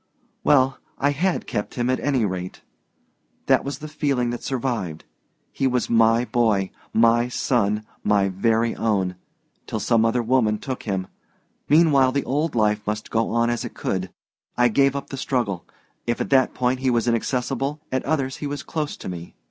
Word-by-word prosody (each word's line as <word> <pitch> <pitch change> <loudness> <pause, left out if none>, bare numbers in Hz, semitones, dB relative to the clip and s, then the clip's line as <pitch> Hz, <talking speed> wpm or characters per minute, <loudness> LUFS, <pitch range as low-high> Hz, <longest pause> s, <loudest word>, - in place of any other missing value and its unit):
"Well 135 -2 +3 0.2
I 145 +1 +2
had 175 +6 0
kept 105 - -4
him, 120 -1 0
at 130 0 +1
any 135 -6 +1
rate. 90 -2 -4 0.8
That - - +4
was 140 - -4
the 155 - -8
feeling 140 -5 0
that 120 - -5
survived. 115 - -3 0.5
He 135 - 0
was 125 -1 0
my 115 +1 +4
boy, 110 -6 +1 0.2
my 115 +1 +4
son, 110 -4 0 0.2
my 100 -1 +3
very 115 +4 +1
own 95 -5 0 0.5
till - - -3
some 115 -1 +2
other 115 +2 +2
woman 115 -3 +2
took 130 +4 -6
him. 95 -1 -1 0.6
Meanwhile 145 -4 +5
the 140 -1 0
old 145 +4 -1
life 105 -2 +2
must 105 0 -3
go 115 0 +1
on 115 +1 +2
as 120 - -2
it 120 - -7
could. 95 -1 -2 0.5
I 120 0 +5
gave 135 +4 +3
up 140 - -5
the 135 - -4
struggle. 120 -9 -2 0.4
If 120 - 0
at - - -3
that 130 -1 +4
point 125 0 +1
he 130 0 +1
was 120 -1 +1
inaccessible, 130 +4 -1
at 130 0 0
others 135 -3 -1
he 145 - -4
was 145 -1 -4
close 150 -2 -3
to - - -8
me. 85 -1 -7
120 Hz, 180 wpm, -23 LUFS, 110-135 Hz, 0.8 s, Meanwhile